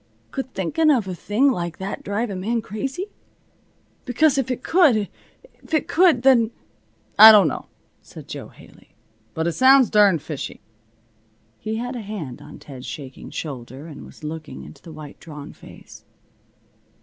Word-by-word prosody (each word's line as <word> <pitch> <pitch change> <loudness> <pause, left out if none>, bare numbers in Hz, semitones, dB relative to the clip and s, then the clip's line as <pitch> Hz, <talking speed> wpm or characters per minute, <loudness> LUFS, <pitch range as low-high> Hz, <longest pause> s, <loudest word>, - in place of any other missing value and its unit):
Could 265 -2 -5
thinking 310 - +1
of 245 -9 +2
a 185 - -3
thing 220 +10 +1
like 170 -7 -4
that 190 +1 -5
drive 210 +3 -2
a - - -4
man 220 +5 -2
crazy? 270 - -5 0.9
Because 275 +2 +2
if 260 - -2
it 250 -1 -3
could 270 - +3 0.5
if - - -3
it 310 - 0
could 330 -8 +4
then 245 -4 +5 0.4
" - - -34
"I 220 +1 +13
don't 210 -3 +6
know," - - -4 0.3
said - - -13
Jo - - -7
Haley, - - -19 0.4
"but 160 - -1
it 170 - +1
sounds 260 +4 +5
darned 200 -7 +4
fishy." 155 -3 -6 1.0
He 220 0 -4
had 245 +3 -4
a 240 - -5
hand 195 - -7
on - - -12
Ted's 130 -3 -11
shaking 135 -3 -8
shoulder, 135 -1 -7
and 155 -4 -10
was - - -15
looking 155 0 -7
into 140 - -13
the 165 - -12
white, 150 -2 -11
drawn 150 -3 -10
face. - - -15
210 Hz, 165 wpm, -22 LUFS, 160-255 Hz, 1.0 s, I